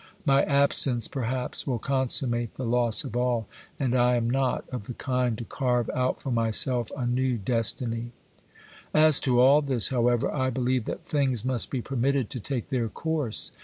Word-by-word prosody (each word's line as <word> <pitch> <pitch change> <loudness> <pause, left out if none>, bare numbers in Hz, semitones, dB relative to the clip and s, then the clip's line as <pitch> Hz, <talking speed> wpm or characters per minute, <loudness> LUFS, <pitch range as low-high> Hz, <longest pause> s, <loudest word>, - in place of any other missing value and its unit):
My 140 -1 +4
absence 140 -4 +2
perhaps 125 0 -2
will 125 -3 0
consummate 125 -2 0
the 130 - -5
loss 120 -1 +2
of 110 - -7
all, 120 -3 0 0.3
and 130 -4 0
I 125 -1 +3
am 115 -1 0
not 130 +1 0
of 125 -5 -6
the 125 - -6
kind 125 -4 -1
to 120 - -5
carve 125 -2 -1
out 130 0 -1
for 135 - -5
myself 115 +1 +1
a 125 - -2
new 125 0 0
destiny. 115 +2 -1 0.8
As 155 -1 +6
to 125 -2 +1
all 135 +4 +6
this, 130 -7 +2
however, 120 -2 +1
I 130 -3 0
believe 125 -2 -1
that - - -6
things 130 -6 -1
must 130 -3 0
be 130 -4 -3
permitted 135 -2 -1
to 125 - -3
take 125 +2 -4
their 120 -5 -1
course. 150 -3 -2
125 Hz, 175 wpm, -26 LUFS, 120-135 Hz, 0.8 s, As